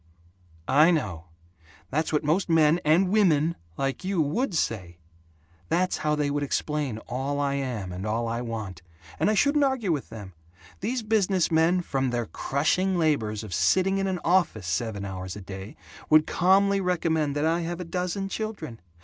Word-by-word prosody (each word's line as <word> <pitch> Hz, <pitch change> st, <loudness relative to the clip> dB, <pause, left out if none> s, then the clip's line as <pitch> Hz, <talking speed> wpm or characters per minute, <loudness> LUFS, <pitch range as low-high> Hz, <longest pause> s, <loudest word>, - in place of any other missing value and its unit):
"I 150 Hz, +5 st, +5 dB
know. 100 Hz, -, -1 dB, 0.7 s
That's 155 Hz, +4 st, 0 dB
what 150 Hz, 0 st, +1 dB
most 165 Hz, +5 st, +1 dB
men 160 Hz, 0 st, +4 dB
and 170 Hz, +5 st, +3 dB
women 170 Hz, -6 st, +3 dB, 0.2 s
like 135 Hz, +5 st, -2 dB
you 190 Hz, -1 st, -1 dB
WOULD 170 Hz, -, 0 dB
say. 95 Hz, -, -2 dB, 0.7 s
That's 180 Hz, +2 st, +1 dB
how 150 Hz, 0 st, 0 dB
they 145 Hz, -1 st, 0 dB
would 145 Hz, 0 st, -1 dB
explain 145 Hz, -3 st, -2 dB
all 135 Hz, +3 st, -2 dB
I 140 Hz, -1 st, 0 dB
am 125 Hz, -9 st, -3 dB
and 90 Hz, +1 st, -6 dB
all 115 Hz, +2 st, -1 dB
I 115 Hz, +1 st, -2 dB
want. 110 Hz, -7 st, -5 dB, 0.4 s
And -, -, +2 dB
I 215 Hz, -, +2 dB
shouldn't 285 Hz, +6 st, +3 dB
argue 260 Hz, -9 st, +1 dB
with 145 Hz, -4 st, -2 dB
them. 100 Hz, -4 st, -9 dB, 0.5 s
These 235 Hz, +4 st, -2 dB
business 200 Hz, -5 st, +1 dB
men, 165 Hz, +3 st, +3 dB
from 135 Hz, -6 st, -1 dB
their 120 Hz, -1 st, -1 dB
crushing 180 Hz, +11 st, 0 dB
labors 115 Hz, -10 st, 0 dB
of 105 Hz, -4 st, -7 dB
sitting 185 Hz, -, +2 dB
in 195 Hz, -, 0 dB
an 190 Hz, -1 st, -1 dB
office 170 Hz, -, +2 dB
seven 100 Hz, +2 st, -2 dB
hours 95 Hz, -1 st, -6 dB
a 105 Hz, -, -8 dB
day, 95 Hz, +2 st, -8 dB, 0.3 s
would 155 Hz, 0 st, +6 dB
calmly 195 Hz, +2 st, +3 dB
recommend 160 Hz, -5 st, 0 dB
that 145 Hz, +1 st, 0 dB
I 165 Hz, +2 st, +1 dB
have 170 Hz, +1 st, -4 dB
a 180 Hz, -, -5 dB
dozen 180 Hz, +3 st, -2 dB
children. 195 Hz, -, -5 dB
155 Hz, 175 wpm, -26 LUFS, 115-185 Hz, 0.7 s, would